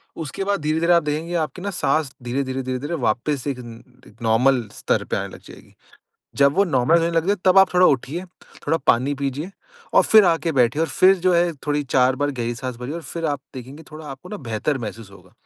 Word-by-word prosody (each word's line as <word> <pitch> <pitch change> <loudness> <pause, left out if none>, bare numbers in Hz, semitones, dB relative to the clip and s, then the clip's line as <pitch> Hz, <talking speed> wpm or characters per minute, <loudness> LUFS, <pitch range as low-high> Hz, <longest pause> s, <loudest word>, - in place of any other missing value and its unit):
उसके 160 +4 -5
बाद 200 +1 0
धीरे-धीरे 160 +3 +2
आप 170 -1 +4
देखेंगे 155 +3 -3
आपकी 165 +2 -2
ना 200 - -3
साँस 155 -5 0
धीरे-धीरे-धीरे-धीरे 130 +3 -3
वापस 125 +5 0
एक 135 -3 -3
न 125 +2 -15
नॉर्मल 120 +3 +3
स्तर - - -1
पर - - -2
आने - - -5
लग - - -12
जाएगी। - - -15 0.6
जब 140 0 +4
वो 195 - +4
नॉर्मल 155 -1 +3
होने 165 0 0
लग 165 0 0
जाए 200 +1 +2
तब 185 0 +6
आप 195 - +5
थोड़ा 180 0 +6
उठिए, 145 +4 0 0.4
थोड़ा 160 +3 +2
पानी 130 +5 +3
पीजिए 140 +5 -4 0.4
और - - +7
फिर 215 -2 +6
आके 165 -1 +1
बैठिए 125 +1 +2
और 165 - -1
फिर 185 +5 +5
जो 180 0 +1
है 170 0 +2
थोड़ी 145 0 0
4 130 -1 +2
बार 145 +1 0
गहरी 120 -3 -3
साँस 125 0 -6
भरिए 125 +5 -6
और 170 - -6
फिर 165 +4 -6
आप 145 -3 -2
देखेंगे 130 +4 -9
थोड़ा 155 0 -10
आपको 135 +5 -9
ना 210 - -6
बेहतर 115 +6 -1
महसूस 115 -3 -7
होगा। 95 -1 -18
145 Hz, 215 wpm, -22 LUFS, 125-170 Hz, 0.6 s, और